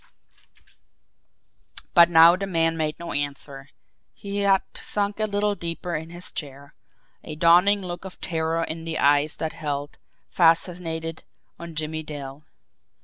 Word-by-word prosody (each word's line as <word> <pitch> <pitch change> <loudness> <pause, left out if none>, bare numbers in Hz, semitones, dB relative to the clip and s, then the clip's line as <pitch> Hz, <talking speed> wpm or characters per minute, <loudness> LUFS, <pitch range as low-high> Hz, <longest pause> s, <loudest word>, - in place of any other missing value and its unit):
But 170 -2 +7
now 165 +1 +8
the 195 +1 -4
man 165 -3 +1
made 155 -1 -2
no 170 0 -6
answer. 140 -1 -5 0.5
He 200 0 -5
had 195 -1 +3
sunk 205 0 -3
a 215 - +1
little 205 0 0
deeper 170 -1 -4
in 160 +1 -5
his 175 +1 -6
chair 140 -1 -8 0.5
a 155 - -7
dawning 175 +5 +5
look 175 -1 -6
of 190 -1 -10
terror 165 -1 -1
in 165 0 -5
the 165 -1 -4
eyes 145 +2 +2
that 160 0 -3
held, 145 -3 -5 0.3
fascinated, 165 -1 +1 0.4
on 170 -1 -9
Jimmie 155 0 -2
Dale. 145 -2 -8
165 Hz, 140 wpm, -24 LUFS, 155-180 Hz, 0.5 s, now